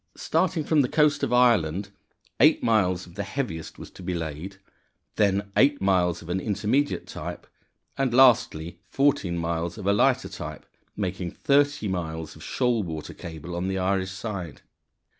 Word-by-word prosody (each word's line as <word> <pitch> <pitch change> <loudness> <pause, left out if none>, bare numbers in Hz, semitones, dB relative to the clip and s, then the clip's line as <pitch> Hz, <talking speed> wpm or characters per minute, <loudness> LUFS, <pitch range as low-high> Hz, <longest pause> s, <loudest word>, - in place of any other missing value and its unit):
Starting 165 -1 0
from 150 0 +3
the 125 - 0
coast 150 -2 +3
of 140 -4 -1
Ireland, 105 -7 +3 0.5
eight - - +5
miles 95 -5 +2
of 85 - -15
the 100 - -4
heaviest 100 - -4
was - - -10
to - - -13
be 90 0 -3
laid, 80 +4 -5 0.6
then 100 -1 +1
eight 140 +1 +4
miles 90 -3 +1
of 85 - -12
an 90 +2 0
intermediate 115 +8 0
type, - - -7 0.5
and 135 -2 +1
lastly 105 -10 +4
fourteen 135 -11 +1
miles 85 0 -2
of 100 - -7
a 100 - +3
lighter 100 - +2
type, - - -8 0.3
making 95 -3 -3
thirty 145 - +1
miles 80 -4 -4
of - - -12
shoal 125 -3 0
water 80 -5 -6
cable 85 +1 -8
on 90 +2 -2
the 95 0 -1
Irish 95 0 0
side. 95 -4 -6
95 Hz, 160 wpm, -25 LUFS, 85-125 Hz, 0.6 s, eight